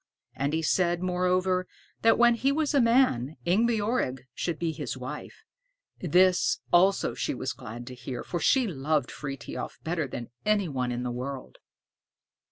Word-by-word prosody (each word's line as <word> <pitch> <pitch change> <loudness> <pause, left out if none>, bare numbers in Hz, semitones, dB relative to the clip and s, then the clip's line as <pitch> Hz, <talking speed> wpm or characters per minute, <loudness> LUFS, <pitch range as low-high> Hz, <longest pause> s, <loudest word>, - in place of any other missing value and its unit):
And 140 +2 -1
he 160 0 0
said, 175 +2 +1
moreover, 185 0 +1 0.3
that 225 - +5
when 240 0 +6
he 265 +4 +1
was 300 +1 0
a 280 - +5
man, 230 - +3
Ingebjorg 210 - +1
should 170 +4 -2
be 165 -1 -1
his 140 -6 -5
wife. 130 - -8 0.6
This 180 +2 +3 0.2
also 190 +3 +4
she - - -2
was - - -3
glad 120 +2 -8
to 130 - -8
hear, 125 0 -6
for 175 - -3
she 260 - +3
loved 150 - -1
Frithiof 135 -4 -6
better 160 -2 -1
than 120 -2 -7
any 210 -3 +2
one 130 -4 -2
in 120 0 -3
the 125 - -2
world. 130 +2 -6
170 Hz, 160 wpm, -28 LUFS, 130-195 Hz, 0.6 s, when